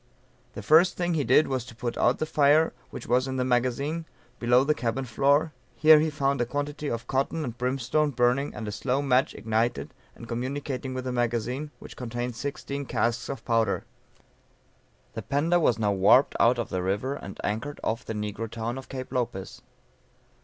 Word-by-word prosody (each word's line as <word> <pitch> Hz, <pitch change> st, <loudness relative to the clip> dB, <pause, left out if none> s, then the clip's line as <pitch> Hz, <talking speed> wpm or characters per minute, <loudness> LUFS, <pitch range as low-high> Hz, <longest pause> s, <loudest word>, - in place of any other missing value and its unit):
The 105 Hz, -, -7 dB
first 160 Hz, -, +5 dB
thing 175 Hz, -1 st, 0 dB
he 155 Hz, -3 st, +1 dB
did 135 Hz, +6 st, +4 dB
was 130 Hz, -3 st, -2 dB
to 115 Hz, -, -12 dB
put 120 Hz, +1 st, -4 dB
out 120 Hz, -, +2 dB
the -, -, -1 dB
fire 155 Hz, +1 st, +3 dB, 0.2 s
which -, -, -8 dB
was 125 Hz, +2 st, +2 dB
in 130 Hz, -, -3 dB
the 125 Hz, -, 0 dB
magazine, 130 Hz, +6 st, 0 dB, 0.3 s
below 125 Hz, +2 st, +4 dB
the 150 Hz, +2 st, +2 dB
cabin 130 Hz, -1 st, -2 dB
floor; 140 Hz, +6 st, +2 dB, 0.2 s
here 155 Hz, +5 st, +7 dB
was 155 Hz, +1 st, 0 dB
found 140 Hz, -2 st, 0 dB
a -, -, +2 dB
quantity 145 Hz, +2 st, -3 dB
of 115 Hz, 0 st, -4 dB
cotton 140 Hz, +4 st, -1 dB
and 120 Hz, -5 st, -5 dB
brimstone 130 Hz, +4 st, 0 dB
burning 125 Hz, +2 st, +1 dB
and 110 Hz, 0 st, -5 dB
a -, -, -3 dB
slow 130 Hz, +6 st, -1 dB
match 130 Hz, -1 st, +2 dB
ignited 110 Hz, +2 st, -1 dB, 0.2 s
and 115 Hz, -, -11 dB
communicating 130 Hz, +2 st, -4 dB
with 130 Hz, -, -3 dB
the 130 Hz, -, -3 dB
magazine, 120 Hz, +4 st, -1 dB
which -, -, -12 dB
contained 120 Hz, 0 st, -4 dB
sixteen 140 Hz, +1 st, -5 dB
casks 120 Hz, +1 st, -1 dB
of 135 Hz, -, -6 dB
powder. 115 Hz, -3 st, +1 dB, 1.3 s
The -, -, -5 dB
Panda 160 Hz, +5 st, +1 dB
was 125 Hz, -8 st, +2 dB
now 105 Hz, -2 st, +1 dB
warped 100 Hz, +7 st, +4 dB
out 120 Hz, +1 st, +4 dB
of 120 Hz, -, -3 dB
the 90 Hz, -, -2 dB
river 100 Hz, +9 st, -1 dB
and 100 Hz, -8 st, -8 dB
anchored 115 Hz, +8 st, -3 dB
off 115 Hz, +2 st, -1 dB
the -, -, -5 dB
negro 105 Hz, +1 st, -4 dB
town 115 Hz, +3 st, -4 dB
of 130 Hz, -, -12 dB
Cape 130 Hz, -2 st, -6 dB
Lopez. 120 Hz, -7 st, -3 dB
125 Hz, 190 wpm, -27 LUFS, 115-140 Hz, 1.3 s, here